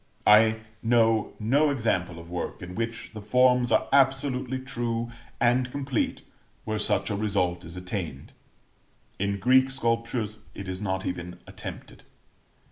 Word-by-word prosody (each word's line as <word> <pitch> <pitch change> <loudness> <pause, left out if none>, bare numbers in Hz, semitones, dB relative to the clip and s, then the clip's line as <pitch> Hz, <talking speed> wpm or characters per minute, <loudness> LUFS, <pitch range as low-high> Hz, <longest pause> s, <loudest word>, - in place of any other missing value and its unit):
I 110 +1 +6 0.2
know 115 -2 +3
no 140 +8 +3
example 95 -10 0
of 85 0 -10
work 90 +2 -5
in 90 0 -7
which 115 +2 -4
the 110 - -7
forms 125 +3 +3
are - - +3
absolutely 135 -1 +2
true 120 -3 -3 0.3
and 125 +1 +3
complete 135 -3 -2 0.4
where 110 -1 -1
such 105 - 0
a - - 0
result 95 -4 0
is 85 +2 -9
attained; 90 -7 -5 0.9
in 100 +1 0
Greek 130 +4 +5
sculptures 115 -3 -1 0.2
is 95 -1 -5
not 95 -2 -2
even 90 0 -4
attempted. - - -9
110 Hz, 130 wpm, -27 LUFS, 95-125 Hz, 0.9 s, I